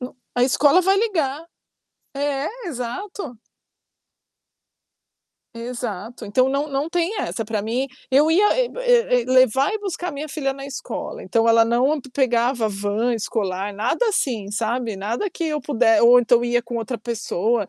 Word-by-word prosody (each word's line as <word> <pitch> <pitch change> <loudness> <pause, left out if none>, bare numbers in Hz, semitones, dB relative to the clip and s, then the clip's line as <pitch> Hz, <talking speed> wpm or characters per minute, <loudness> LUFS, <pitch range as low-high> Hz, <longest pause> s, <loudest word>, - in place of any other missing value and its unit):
n 250 +1 -6 0.2
a 245 - +2
escola 285 +6 +4
vai 385 +2 +3
ligar. 325 -8 -1 0.7
É, 280 0 -1 0.2
exato. 255 - -6 2.2
Exato, 235 -2 -6
então 255 +6 +2
não 280 +2 0
não 280 +2 -2
tem 350 +5 -1
essa 225 - -3
pra 215 -1 -2
mim, 235 +5 -1 0.2
eu 290 +4 +4
ia 400 +6 +4
eh - - +1
eh 485 - +3
eh - - -10
levar 260 +1 +4
e 435 - -2
buscar 360 -3 -4
minha 290 +2 -5
filha 285 -2 -2
na 275 0 -8
escola, 255 -3 -6
então 225 +4 +1
ela 230 0 +6
não 250 +6 +2
pe 265 - -14
pegava 240 -3 +1
van 205 +4 -1
escolar, 205 -3 -2
nada 240 - 0
assim, 230 - -1
sabe. 225 +1 -2
Nada 225 - -2
que 340 -2 -5
eu 305 -2 -1
puder 230 -5 +2
ou 240 +1 +8
então 240 0 +3
ia 240 0 +1
com 235 0 -5
outra 230 +2 -4
pessoa, 220 -2 -1
250 Hz, 160 wpm, -22 LUFS, 230-295 Hz, 2.2 s, ou